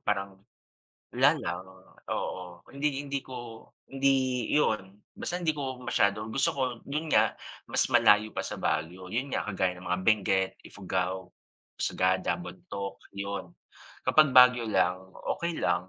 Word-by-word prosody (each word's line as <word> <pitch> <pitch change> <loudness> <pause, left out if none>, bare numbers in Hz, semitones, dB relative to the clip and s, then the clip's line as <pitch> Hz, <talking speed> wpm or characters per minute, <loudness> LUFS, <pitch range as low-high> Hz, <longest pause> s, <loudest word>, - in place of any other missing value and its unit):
parang, 95 -1 -2 0.7
wala - - +5
lang, 90 +2 -4 0.5
oo. 90 -1 -5
Hindi 140 0 -1
hindi 140 -1 -2
ko 130 - -9 0.6
hindi 135 0 +1 0.5
'yon, 105 -10 +1 0.2
basta 175 +1 -3
hindi 170 -3 +2
ko 130 -3 -4
masyado 100 -3 +1
gusto 135 - +2
ko 140 - -4 0.3
'yon 150 +3 -3
nga, - - +4 0.3
mas - - +2
malayo 105 +1 +5
pa - - -4
sa - - -4
Baguio. 85 +4 -2
'Yon 130 +6 -2
nga, - - 0
kagaya 95 -2 0
ng 90 - -11
mga 90 +1 0
Benguet, 95 -3 +3
Ifugao, 95 -1 -3 0.4
Sagada, 95 0 +1
Bontoc, 100 - -7
'yon. 100 0 -4 0.6
Kapag 155 -2 +5
Baguio 125 -2 +7
lang, 95 -2 +1 0.2
okey 170 -1 -3
lang. 90 +1 0
100 Hz, 140 wpm, -29 LUFS, 95-135 Hz, 0.7 s, Baguio